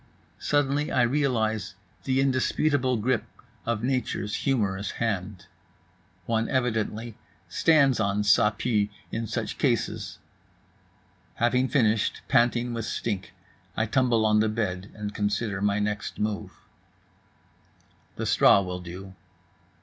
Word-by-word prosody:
Suddenly 145 0 +1
I 125 - +3
realize 110 -6 0 0.3
the 130 0 +1
indisputable 130 0 +1
grip 120 +2 0 0.4
of 115 -1 -1
nature's 125 -5 -1
humorous 100 -7 0
hand. 100 -4 -2 0.8
One 115 0 0
evidently 115 -3 -1 0.3
stands 140 -6 +3
on 100 0 +1
Ça 105 +1 +4
Pue 105 -3 +1 0.2
in 115 0 -3
such - - -4
cases. - - -1 1.2
Having 125 +2 +2
finished, 115 -6 +1
panting 120 -1 +2
with 115 -1 -3
stink, 105 -4 -3 0.4
I 110 - +2
tumble 120 -1 +2
on 105 0 +4
the 110 0 +2
bed 100 -4 -2
and 105 -1 -5
consider 105 -1 -1
my 100 0 +2
next 105 0 -2
move. 105 -1 -2 1.6
The - - -3
straw 100 - +5
will 90 -1 -4
do. 90 +2 -9
110 Hz, 115 wpm, -26 LUFS, 105-125 Hz, 1.6 s, straw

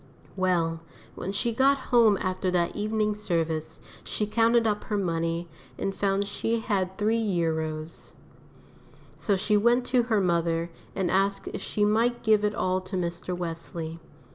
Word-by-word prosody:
Well, 175 -3 +1 0.3
when 190 - -4
she 230 +4 -1
got 275 +4 +4 0.2
home 225 -4 +6
after 185 0 -1
that 175 -1 +1
evening 215 0 0
service, 165 -6 -2 0.2
she 210 - -2
counted 230 +2 +3
up 210 -1 0
her 210 - -1
money, 165 -2 -1 0.3
and 195 - -2
found 200 0 0
she 225 +3 -1
had 190 -4 -1
£3. 165 -8 -1 1.0
So 205 - 0
she 210 +3 +1
went 240 +4 +3
to 250 -1 +3
her 230 -3 +1
mother 170 -2 +1 0.2
and 190 -3 0
asked 195 0 +1
if - - -6
she 210 - 0
might 230 +3 +1
give 215 -2 +4
it 210 0 +1
all 185 0 0
to 185 +1 -7
Mr. 175 0 -3
Wesley. 165 -1 -5
195 Hz, 150 wpm, -27 LUFS, 170-215 Hz, 1.0 s, home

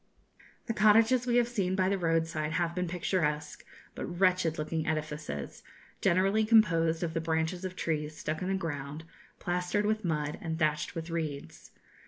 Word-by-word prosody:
The 230 - -2
cottages 225 +4 +4
we 240 - +2
have 240 -1 +4
seen 195 -6 -1
by 185 -1 +2
the 195 +1 +1
roadside 165 -2 0
have 170 -1 0
been 180 0 -2
picturesque 155 -4 -1 0.3
but - - -5
wretched 180 -2 +2
looking 155 +1 -2
edifices, 155 - -4 0.4
generally 195 +5 +3
composed 165 -7 +4
of 165 -2 -2
the 165 - -1
branches 160 +2 -1
of 185 -1 -4
trees 155 -3 -2
stuck 155 +1 -3
in 185 - -2
the 195 - +1
ground, 150 -3 -4 0.3
plastered 180 +3 -1
with 215 +1 0
mud 150 -3 -2
and 160 -1 -3
thatched 150 -2 0
with 165 0 -5
reeds. 155 -4 -5
165 Hz, 165 wpm, -30 LUFS, 155-190 Hz, 0.4 s, cottages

